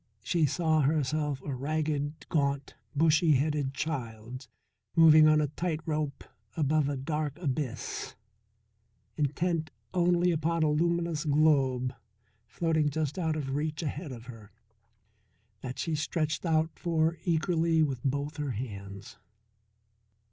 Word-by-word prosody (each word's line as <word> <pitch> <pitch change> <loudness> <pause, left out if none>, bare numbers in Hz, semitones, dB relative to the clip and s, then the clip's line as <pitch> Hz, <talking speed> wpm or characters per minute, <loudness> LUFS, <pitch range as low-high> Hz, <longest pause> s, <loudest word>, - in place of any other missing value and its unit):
She 165 -4 +2
saw 155 +2 +2
herself 150 -1 0
a 145 - -4
ragged, 150 +2 -2
gaunt, 140 -3 0 0.2
bushy 160 +1 +4
headed 140 -1 0
child 125 -4 -5 0.5
moving 155 -1 +8
on 155 0 +5
a 150 -2 +1
tight 160 +1 -2
rope 150 -3 -2 0.3
above 150 -1 +2
a 140 - -2
dark 150 +1 -2
abyss, 145 -6 -3 1.0
intent 155 +2 0 0.2
only 175 0 +3
upon 165 0 0
a 150 - +3
luminous 170 0 0
globe 140 -4 +2 0.5
floating 160 +2 +1
just 155 +3 -2
out 160 -3 0
of 135 -3 -3
reach 150 +2 -2
ahead 150 +1 -4
of 120 -2 -9
her, 115 -4 -11 1.1
that 125 +4 -6
she 165 - -2
stretched 155 +2 -1
out 160 0 +2
for 165 -1 +1
eagerly 165 -1 +2
with 135 -5 -2
both 145 +2 -2
her 145 -3 -2
hands. 100 -2 -7
150 Hz, 125 wpm, -29 LUFS, 140-160 Hz, 1.1 s, moving